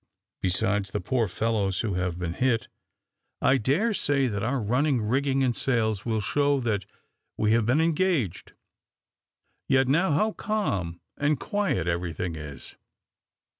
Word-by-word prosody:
"Besides 100 +2 +1
the - - -2
poor 115 +5 0
fellows 100 0 0
who 110 -4 -2
have 90 -1 -1
been 90 -2 -3
hit, 125 +2 +1 0.7
I 135 - +4
dare 150 - +1
say 140 -7 +1
that 105 -5 -2
our 130 +5 0
running 125 +5 +1
rigging 135 +4 +1
and 125 -3 +1
sails 110 -6 0
will 110 -2 0
show 145 +6 +1
that 105 -6 -1 0.5
we 105 0 +2
have 115 -1 +3
been 130 +6 +3
engaged; 160 - 0 1.1
yet 130 -1 +3
now 165 +7 +3
how 215 +10 +2
calm 100 - -2 0.2
and 145 -1 +1
quiet 200 - -1
everything 85 0 -2
is." 75 -4 -9
115 Hz, 140 wpm, -26 LUFS, 95-140 Hz, 1.1 s, I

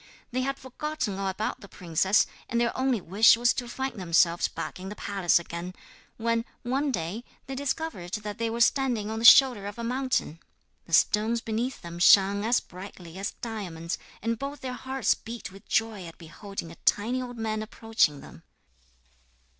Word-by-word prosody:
They 255 +1 0
had 275 +1 -2
forgotten 260 -6 -4
all 195 - -1
about 190 +3 -3
the 200 - -11
princess, 185 +3 +2 0.2
and 235 - 0
their 235 -1 +1
only 260 -3 +1
wish 200 +6 +5
was 240 +1 +3
to 245 -1 -4
find 265 -2 -4
themselves 170 -1 +3
back - - -6
in 190 +1 -7
the 210 - -7
palace 195 -4 +2
again, 170 +1 -5 0.4
when, 230 0 0 0.2
one 270 +4 0
day, 180 +3 -3 0.2
they 270 - -6
discovered 265 - -3
that 210 +1 -6
they 230 0 0
were 230 +1 -3
standing 235 -4 +2
on 220 - -3
the 230 - -1
shoulder 245 -6 +8
of 205 - -7
a 235 - -5
mountain. 250 - -1 0.5
The 165 - -11
stones 215 +6 +3
beneath 230 +3 -3
them 170 0 -7
shone 200 +2 +6
as 235 +2 +3
brightly 180 -1 -11
as 200 - -3
diamonds, 180 -8 -4 0.2
and 230 0 -1
both 280 0 -5
their 255 -1 -4
hearts 260 0 0
beat 230 -3 -8
with 195 +2 -16
joy 220 -5 0
at 165 - -12
beholding 170 +2 -8
a 170 - -13
tiny 240 +5 +1
old 245 -1 -7
man 215 -1 -2
approaching 215 -9 0
them. - - -13
220 Hz, 180 wpm, -27 LUFS, 190-245 Hz, 0.5 s, shoulder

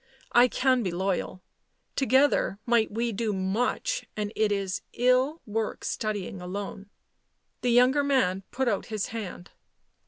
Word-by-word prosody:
I 240 +1 +6
can 255 0 +2
be 195 - -1
loyal. 185 0 -2 0.5
Together 265 -5 +3
might 235 -2 +3
we 230 +2 -1
do 215 0 -1
much, 240 - -1
and 210 0 -3
it 215 -1 +2
is 195 -2 -1
ill 255 +6 +2
work 220 0 -3
studying 205 -3 -3
alone." 195 +2 -6 0.7
The 250 - +1
younger 250 +4 +5
man 230 -10 +2
put 265 +1 -1
out 205 -4 0
his 215 -3 -3
hand. 205 -5 -7
220 Hz, 135 wpm, -27 LUFS, 195-250 Hz, 0.7 s, I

